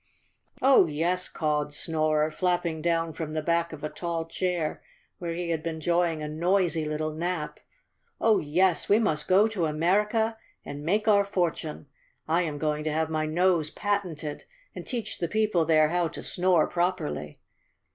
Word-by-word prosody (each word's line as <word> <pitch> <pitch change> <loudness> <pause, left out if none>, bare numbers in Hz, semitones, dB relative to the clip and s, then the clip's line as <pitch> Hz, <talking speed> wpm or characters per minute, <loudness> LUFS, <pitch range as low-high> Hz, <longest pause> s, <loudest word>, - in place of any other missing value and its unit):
"Oh, 265 -9 +6
yes," 170 +4 -1
cawed 150 -1 -1
Snorer, 155 -1 +1
flapping 175 -2 -1
down 165 -1 0
from 155 0 -5
the 155 - -1
back 170 +1 +1
of 155 -2 -9
a 150 - -2
tall 170 -1 -3
chair 170 -1 -2 0.4
where 170 -1 -3
he 175 -1 -3
had 160 -2 -1
been 165 0 -3
enjoying 170 0 0
a - - -3
noisy 170 +1 +1
little 155 +1 -2
nap. 165 -1 -3 0.6
"Oh, 220 -2 +4
yes, 175 +4 +1
we 205 - +6
must 155 -10 0
go 195 +4 +5
to 185 -7 -1
America 210 +8 +1 0.3
and 145 0 -6
make 210 +7 0
our 200 -2 +5
fortune. 175 -6 -2 0.4
I 165 +3 +2
am 155 -4 -3
going 150 0 -1
to 155 - 0
have 160 +1 -1
my 155 -1 0
nose 170 -1 +2
patented 175 -8 -3 0.3
and - - -8
teach 240 -3 -4
the 170 - -1
people 210 -4 +1
there 155 -1 +4
how 175 0 +1
to 160 - -8
snore 180 -3 +2
properly." 175 - -2
165 Hz, 165 wpm, -27 LUFS, 155-180 Hz, 0.6 s, Oh